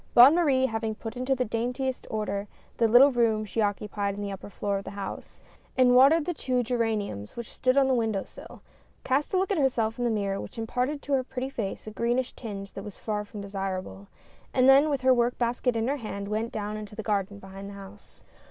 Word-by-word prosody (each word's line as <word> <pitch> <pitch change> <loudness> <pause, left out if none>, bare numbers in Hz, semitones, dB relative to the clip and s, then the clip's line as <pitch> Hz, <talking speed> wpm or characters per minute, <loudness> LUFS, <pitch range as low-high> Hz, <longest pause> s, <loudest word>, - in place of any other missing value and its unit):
Bonne 250 +5 +10
Marie 285 -7 +3
having 225 -2 -2
put 225 +1 -7
into 255 +2 0
the 255 -1 0
dain 230 +3 -2
tiest 260 0 -3
order 210 -2 -2 0.3
the 230 - +4
little 250 +5 +7
room 225 -3 +2
she 220 +2 -2
occupied 205 -1 -1
on 205 - -6
the 200 - -3
upper 195 +1 -8
fioor 200 0 -2
of - - -9
the - - -7
house 195 -1 -7 0.2
— - - -33
and 250 -1 +5
watered 285 +5 +6
the 350 - -1
two 255 -5 -1
geraniums 220 - -2
which 235 -2 -7
stood 255 +1 +1
on 275 -1 +5
the 265 - +3
window 225 -5 0
sill - - -13 0.2
— - - -35
cast 270 +3 0
a 375 - +2
look 380 +2 +1
at 380 - +1
herself 235 -5 +1
in - - 0
the 240 - +2
mirror 200 -3 -1
which - - -10
imparted 250 +6 -2
to 285 - -2
her 265 -1 +3
pretty 260 +1 -5
face 205 -7 -4
a 215 - -6
greenish 240 +3 -1
tinge 200 -4 -7
that 195 - -7
was 210 -1 -9
far 210 -1 -3
from 210 0 -9
desirable, 195 0 -5 0.5
and 255 0 +5
then 275 +3 +7
with 280 -3 -1
her 260 0 +5
work 240 0 +1
basket 245 0 0
in 225 +1 0
her 280 +2 0
hand, 200 -5 -5
went 220 +3 -2
down 210 0 -4
into 210 -1 -8
the 220 - -5
garden, 205 -1 -1
beliind 195 0 -9
the - - -9
house. 200 +1 -13
225 Hz, 235 wpm, -27 LUFS, 205-255 Hz, 0.5 s, Bonne